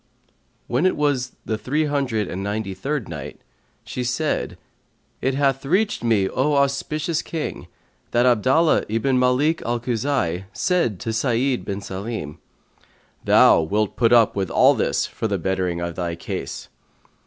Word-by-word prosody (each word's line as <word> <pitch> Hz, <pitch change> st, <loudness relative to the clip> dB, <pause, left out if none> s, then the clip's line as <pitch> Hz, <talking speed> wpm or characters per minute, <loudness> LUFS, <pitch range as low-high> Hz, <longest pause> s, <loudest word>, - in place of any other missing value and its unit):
When 130 Hz, +9 st, +1 dB
it -, -, 0 dB
was 135 Hz, -4 st, 0 dB
the 110 Hz, -1 st, -2 dB
Three 150 Hz, +7 st, 0 dB
Hundred 135 Hz, -8 st, -1 dB
and 95 Hz, +2 st, -5 dB
Ninety 100 Hz, 0 st, -3 dB
third 135 Hz, +5 st, -3 dB
Night 75 Hz, -3 st, -7 dB, 0.4 s
She 125 Hz, -, -4 dB
said, 125 Hz, +5 st, -1 dB, 0.6 s
It 130 Hz, +1 st, 0 dB
hath 135 Hz, -1 st, +1 dB
reached 190 Hz, -, 0 dB
me, 110 Hz, -5 st, +2 dB
O 145 Hz, +8 st, 0 dB
auspicious 145 Hz, +3 st, 0 dB
King, 160 Hz, -2 st, -5 dB, 0.4 s
that 120 Hz, +1 st, +2 dB
Abdallah 130 Hz, +7 st, +3 dB
ibn 125 Hz, +4 st, +1 dB
Malik 130 Hz, +6 st, +2 dB
al 120 Hz, 0 st, -1 dB
Khuza'i 115 Hz, -7 st, -1 dB
said 170 Hz, -, 0 dB
to 115 Hz, -, -3 dB
Sa'id 125 Hz, +2 st, 0 dB
bin 100 Hz, 0 st, -4 dB
Salim, 95 Hz, -6 st, -6 dB, 0.8 s
"Thou -, -, +6 dB
wilt 105 Hz, +6 st, -1 dB
put 115 Hz, -1 st, +2 dB
up 115 Hz, -3 st, +5 dB
with 95 Hz, -3 st, -1 dB
all -, -, +5 dB
this -, -, 0 dB
for 110 Hz, -, -4 dB
the 100 Hz, -2 st, -1 dB
bettering 90 Hz, -1 st, -1 dB
of 85 Hz, 0 st, -3 dB
thy 85 Hz, -1 st, -3 dB
case." 85 Hz, -, -6 dB
120 Hz, 150 wpm, -22 LUFS, 100-140 Hz, 0.8 s, Thou